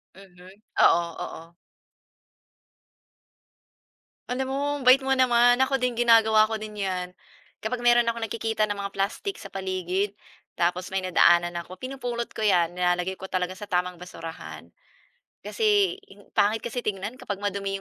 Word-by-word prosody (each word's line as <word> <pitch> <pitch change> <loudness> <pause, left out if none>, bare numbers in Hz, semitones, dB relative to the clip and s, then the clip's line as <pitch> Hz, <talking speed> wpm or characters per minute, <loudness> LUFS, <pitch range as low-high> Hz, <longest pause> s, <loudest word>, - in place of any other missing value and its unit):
Mhm, 185 -1 -15 0.3
oo, 170 0 +5 0.2
oo. 165 +1 -11 2.8
Alam 260 +1 -1
mo, - - -1 0.2
ambait 260 +1 +6
mo 270 - -1
naman, 245 -1 +4
ako 265 +1 +2
din 250 -2 -1
ginagawa 220 -2 +5
ko 220 - -3
din 215 -1 -7
'yan. 180 -2 -2 0.5
Kapag 240 +2 -4
meron 240 -1 +5
akong 230 0 -1
nakikita 220 -1 -1
na 210 - 0
mga 200 0 -5
plastic 205 - -2
sa 195 - -11
paligid, 190 +1 -2 0.4
tapos 175 +1 0
may 190 -1 -2
nadaanan 175 -1 +4
ako, 180 +2 -9
pinupulot 245 0 -5
ko - - -10
'yan, 180 -6 +3
nilalagay 180 +1 -1
ko 190 - -7
talaga 185 -1 -2
sa 205 +1 -9
tamang 180 -2 -1
basurahan, 165 -2 -9 0.8
kasi, 410 -4 +1
in 205 - -17 0.2
pangit 215 +2 +3
kasi 235 0 -5
tignan 205 +5 -3
kapag 205 -1 -6
madumi 200 -1 -2
205 Hz, 145 wpm, -25 LUFS, 185-240 Hz, 2.8 s, ambait